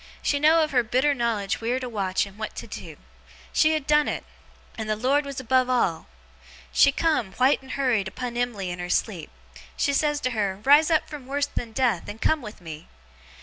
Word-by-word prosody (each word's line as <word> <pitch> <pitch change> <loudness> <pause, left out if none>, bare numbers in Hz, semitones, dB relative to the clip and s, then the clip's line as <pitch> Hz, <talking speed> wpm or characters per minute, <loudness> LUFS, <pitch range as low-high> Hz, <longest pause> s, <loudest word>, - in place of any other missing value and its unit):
She 285 - +1
had - - -5
know'd 320 +2 +5
of 305 - -2
her 250 -2 +4
bitter 255 +5 +1
knowledge 230 -4 -1
wheer 240 +3 0
to 255 - -5
watch 195 -5 -1
and 200 +1 -14
what 215 - -5
to - - -6
do. - - -9 0.6
She 310 0 +4
had 310 -3 -2
done 300 0 +3
it. - - -3 0.5
And 220 -1 -5
the 215 - +1
Lord 270 +6 +1
was 280 -1 -5
above 255 0 +2
all! 195 -10 0 0.7
She 280 - +6
come, 280 -10 0
white 260 +3 +3
and 265 -1 -9
hurried, 245 -8 +1
upon 240 +5 -5
Em'ly 230 -7 -2
in 175 - -6
her 175 0 -5
sleep. 180 -4 -1 0.5
She 280 - +1
says 295 0 +1
to 255 - -1
her, 200 -4 -1
"Rise 295 +5 +6
up 320 -2 +2
from 285 -4 -9
worse 285 +1 0
than 240 -5 -6
death, 230 -6 0
and 210 +2 -8
come 315 +4 +1
with 215 -4 -10
me!" 160 -1 -9
250 Hz, 215 wpm, -25 LUFS, 210-285 Hz, 0.7 s, She